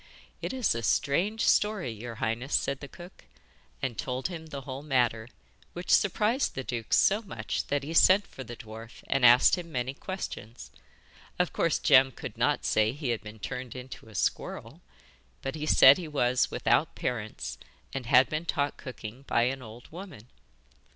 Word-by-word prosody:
'It - - -3
is 260 -3 +1
a 115 - -3
strange 185 - +1
story, 210 - +2
your 115 +2 -7
highness,' 115 +4 -2
said 140 -1 0
the 140 - -8
cook, 175 +5 -13 0.6
and 120 -6 -2
told 130 - -2
him 165 -3 -7
the 140 -3 -6
whole 135 0 -7
matter, 120 -6 +1 0.5
which 175 +1 -4
surprised 215 +6 +2
the 130 - -3
duke 115 -3 -5
so 205 +3 +4
much 115 - -4
that 145 -1 -1
he 155 +3 -5
sent 190 +4 +6
for 130 - -10
the 120 0 -8
dwarf 115 0 -11
and 135 -1 0
asked 125 +8 +7
him 170 -2 -9
many 125 -1 -2
questions. 135 - -7 0.7
Of 180 -1 0
course, 165 - +1
Jem 135 -1 +5
could - - -8
not - - +1
say 110 +1 +2
he 145 -2 -4
had 115 -2 -1
been 105 +1 -10
turned 125 +3 -6
into 125 -3 -9
a 110 - -14
squirrel, - - -3 0.6
but 135 - -3
he 155 -1 -4
said 135 +2 +8
he 170 - -5
was 125 -4 +1
without - - +1
parents 110 - -4 0.3
and 130 -3 -4
had 130 0 +6
been 155 +2 -3
taught 145 -3 -1
cooking 125 -1 -8
by 120 - +2
an 130 +2 -1
old 115 0 -11
woman. 170 - -10
130 Hz, 180 wpm, -28 LUFS, 120-160 Hz, 0.7 s, said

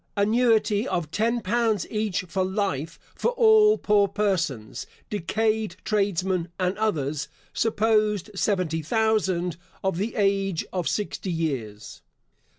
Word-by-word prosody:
Annuity 220 +1 +2
of 170 - -2
ten 230 +5 0
pounds 225 -2 +1
each 210 -3 -1
for 185 +1 -2
life 185 -5 -2 0.2
for - - -1
all 440 -2 +5
poor 205 -1 +3
persons, 180 - -2 0.2
decayed 215 +1 0
tradesmen, 190 -4 0
and 185 +1 0
others 150 -9 -1 0.3
(supposed 215 -2 +1
seventy 185 -5 0
thousand) 185 -2 0 0.3
of 190 -3 0
the 210 +5 -2
age 195 -4 +1
of 180 -3 -1
sixty 200 -2 -3
years. 130 -11 -4
200 Hz, 115 wpm, -25 LUFS, 175-220 Hz, 0.3 s, all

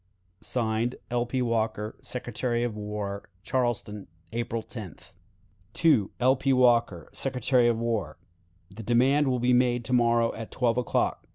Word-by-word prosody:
(Signed) 115 0 -1 0.2
"L. 120 0 0
P. 130 +1 -1
Walker, 110 -2 -1
Secretary 120 -1 -2
of 120 -3 -2
War." 105 -1 -5
"Charleston, 115 -3 -2 0.2
April 115 0 -3
10th. 105 - -9 1.1
"L. 130 +2 +4
P. 135 +1 0
Walker, 120 -9 +3
Secretary 125 -2 +1
of 120 -1 +2
War. 110 -9 -2 0.5
"The 105 +4 -9
demand 130 +6 +3
will 130 -1 +1
be 125 +1 +2
made 125 -1 +2
to 125 - -2
morrow 120 -1 +3
at 115 -1 -7
twelve 120 -1 +1
o'clock. 125 - -1
120 Hz, 140 wpm, -27 LUFS, 110-125 Hz, 1.1 s, L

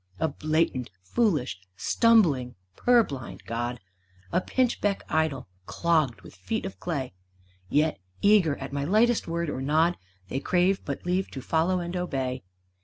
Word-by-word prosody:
A 160 - +1
blatant, 155 -5 0
foolish, 150 - 0 0.2
stumbling, 160 - +3 0.2
purblind 220 - +1
god, 120 +1 -3 0.5
A - - +2
pinchbeck 230 -4 0
idol, 155 -6 0 0.2
clogged 155 - +1
with 85 - -13
feet 205 - -3
of 195 - -7
clay! 140 - -3 0.6
Yet, 155 +1 +2 0.2
eager 200 -8 +4
at 135 0 -7
my 140 0 -1
lightest 220 +8 +3
word 170 0 -1
or 130 -3 -3
nod, 160 +5 +2 0.3
They 135 - -2
crave 180 +5 +2
but 140 +2 -5
leave 180 +2 0
to 135 - -7
follow 175 +3 +1
and 175 +1 -5
obey. 135 -8 -2
160 Hz, 140 wpm, -27 LUFS, 135-185 Hz, 0.6 s, eager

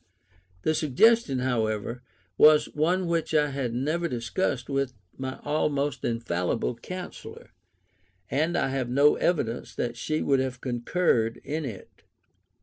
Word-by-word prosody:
The 155 - +2
suggestion, 155 - +3
however, 115 -2 -1 0.3
was 150 +7 +6
one 175 +5 +1
which 165 -2 -1
I 150 -1 +3
had 130 -4 -2
never 155 +7 0
discussed 125 - -2
with 135 -2 -1 0.2
my 130 0 -5
almost 145 -2 0
infallible 115 -2 -1
counsellor, 185 - -8 0.8
and 160 +5 0
I - - +1
have 130 -2 -2
no 140 +4 +4
evidence 125 -9 -1
that 120 -1 -2
she 155 +5 -1
would 135 -1 +3
have 130 -1 -2
concurred 120 -2 0
in 155 +1 -3
it. 110 -8 -9
135 Hz, 130 wpm, -27 LUFS, 120-155 Hz, 0.8 s, was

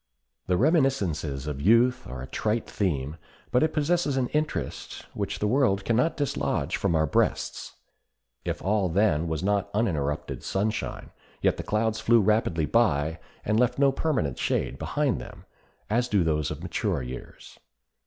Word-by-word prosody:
The 90 -1 +2
reminiscences 100 - +1
of 75 -2 -4
youth 120 - +4
are 65 -1 -6
a - - -7
trite 110 - -1
theme, 75 -6 -2 0.3
but 125 - +3
it 155 - +2
possesses 150 -2 +1
an 125 -2 0
interest 150 0 -3
which - - -3
the - - -1
world 105 -4 +2
can 115 - +2
not 140 +8 +2
dislodge 145 -2 -1
from 85 - 0
our 80 0 +3
breasts. 70 - 0 0.7
If - - -3
all 100 -1 +1
then 85 -3 +2
was 80 +1 -2
not 100 0 +1
uninterrupted 75 -10 -1
sunshine, 105 +3 -2 0.3
yet - - +3
the - - -3
clouds 110 +1 0
flew 115 +1 +4
rapidly 100 -6 +2
by, 80 -7 +2 0.3
and 105 +1 +2
left 125 -1 +2
no 140 0 +4
permanent 135 - -1
shade - - -1
behind - - 0
them, - - -11 0.4
as 120 +3 +1
do 100 -6 +2
those 75 -1 0
of 75 +2 -6
mature 90 -4 -1
years. 65 +1 -9
105 Hz, 160 wpm, -27 LUFS, 80-125 Hz, 0.7 s, youth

